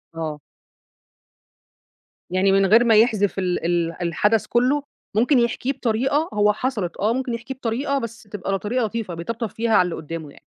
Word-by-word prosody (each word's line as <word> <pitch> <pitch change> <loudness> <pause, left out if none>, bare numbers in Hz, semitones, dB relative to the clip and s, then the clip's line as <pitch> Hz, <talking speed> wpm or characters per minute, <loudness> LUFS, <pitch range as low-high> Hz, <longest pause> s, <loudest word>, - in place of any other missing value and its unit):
آه. 155 -2 -4 1.9
يعني 185 +2 +2
من 195 0 +4
غير 225 +5 +6
ما 225 -2 +4
يحذف 210 -3 +3
ال 180 -3 -1
ال 170 0 -1
الحدث 210 +6 +1
كلّه، 260 +4 +2 0.3
ممكن 245 +4 +4
يحكيه 240 +3 0
بطريقة 265 +5 0
هو 210 0 +3
حصلت، 215 -7 -3
آه 215 +3 +1
ممكن 255 -2 -2
يحكيه 245 +3 -5
بطريقة 265 +3 -1
بس 230 0 -7
تبقى 200 -2 -5
ل - - -2
طريقة 235 +3 -1
لطيفة، 215 -4 -4
بيطبطب 220 +7 -4
فيها 230 +3 -2
على 215 - +6
اللي 175 - -3
قدّامه 160 -1 -7
يعني. - - -16
220 Hz, 170 wpm, -22 LUFS, 185-240 Hz, 1.9 s, غير